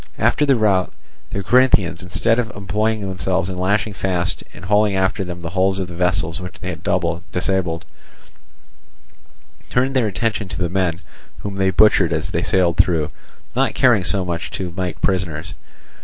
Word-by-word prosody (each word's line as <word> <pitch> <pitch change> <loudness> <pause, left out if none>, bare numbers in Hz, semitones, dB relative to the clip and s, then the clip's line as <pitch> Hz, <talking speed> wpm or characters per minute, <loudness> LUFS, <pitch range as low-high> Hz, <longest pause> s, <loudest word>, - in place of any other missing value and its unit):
After 150 - +2
the 135 - +5
rout, 100 -5 +2 0.4
the 100 - -4
Corinthians, 100 -7 +3
instead 115 +6 0
of 115 -2 -1
employing 105 +2 -1
themselves 95 -1 -1
in 90 - -6
lashing 100 +3 0
fast 90 -2 -1
and 90 - -11
hauling 105 0 +3
after 95 +1 0
them 90 -1 -7
the 85 - -4
hulls 95 +1 +1
of 95 -2 -3
the 90 - -9
vessels 90 0 0
which 90 0 -8
they 90 - -5
had 85 - -6 0.5
disabled, 90 -2 -1 1.8
turned 130 +2 +1
their 125 -4 +3
attention 105 0 -2
to - - -6
the 90 -2 -1
men, 90 -2 -1 0.4
whom 100 -1 -5
they 95 -1 +2
butchered 95 -3 +4
as 80 +3 -2
they 85 - 0
sailed 90 -2 +1
through, 80 -4 +2 0.4
not - - +1
caring 120 -7 +4
so 95 0 +5
much 85 -1 -3
to 90 -3 -5
make 90 -1 -3
prisoners. 90 -5 -1
95 Hz, 170 wpm, -20 LUFS, 90-105 Hz, 1.8 s, the